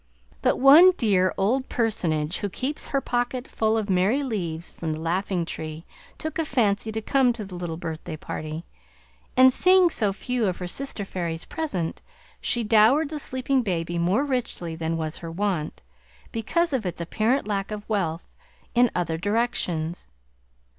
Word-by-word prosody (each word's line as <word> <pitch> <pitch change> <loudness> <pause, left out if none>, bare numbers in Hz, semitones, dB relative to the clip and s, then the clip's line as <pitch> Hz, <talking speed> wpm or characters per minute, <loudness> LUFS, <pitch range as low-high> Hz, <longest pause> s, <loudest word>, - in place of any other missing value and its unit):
But - - +2
one 310 +8 +8
dear 185 -5 +3
old 250 +7 +1
personage 175 -9 0
who 205 - -2
keeps 265 +9 -4
her 275 - 0
pocket 245 +1 -2
full 220 0 +1
of 215 -2 -1
Merry 195 +9 +2
Leaves 175 -9 -3
from 160 -2 -4
the 155 - -5
Laughing 175 +2 -1
Tree, 160 0 -6 0.3
took 315 0 -4
a - - +2
fancy 220 -5 +1
to 220 0 -4
come 265 +1 +3
to 220 -3 -6
the 190 - -11
little 175 -2 -4
birthday 160 -1 -5
party; 155 +2 -6 0.7
and 260 0 +7
seeing 365 +2 +5
so 210 -8 +1
few 240 +2 -1
of 180 - -1
her 180 - -5
sister 230 0 -3
fairies 170 -4 -4
present, 190 - -3 0.4
she 240 - 0
dowered 225 +8 +4
the 305 -1 -4
sleeping 260 0 0
baby 175 -5 -2
more 190 +11 +2
richly 240 - -3
than 165 0 -2
was 160 0 -3
her 165 - -7
wont, 175 -3 -2 0.5
because 295 +9 0
of 255 -4 0
its 180 -3 -4
apparent 220 +9 0
lack 200 -2 -2
of 210 -1 -6
wealth 180 -6 -1 0.5
in 245 0 +5
other 165 -2 -1
directions. 180 - -1
205 Hz, 165 wpm, -25 LUFS, 170-250 Hz, 0.7 s, one